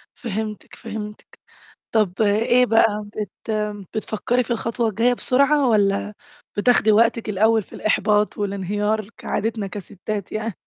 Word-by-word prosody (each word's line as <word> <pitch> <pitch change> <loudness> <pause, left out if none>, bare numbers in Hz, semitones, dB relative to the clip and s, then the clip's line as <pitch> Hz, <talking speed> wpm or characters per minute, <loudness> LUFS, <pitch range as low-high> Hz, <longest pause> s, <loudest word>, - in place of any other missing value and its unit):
فهمتِك، 215 -2 -5
فهمتِك. 210 -2 -8 0.5
طَب 215 -3 +1
إيه 225 +4 +4
بقى؟ 225 -2 +3
بت 210 +1 -6 0.4
بتفكّري 225 +3 -1
في 240 - -7
الخطوة 230 0 0
الجايّة 230 +4 +2
بسرعة، 275 +3 +2
والّا 205 -1 +2 0.4
بتاخدي 220 0 +4
وقتِك 225 +1 +3
الأوّل 220 +2 +3
في - - -17
الإحباط 210 0 +1
والانهيار 205 +1 -1
كعادتنا 215 -1 -2
كَسِتّات 200 +1 -6
يع 215 +1 -2
215 Hz, 120 wpm, -22 LUFS, 205-230 Hz, 0.5 s, إيه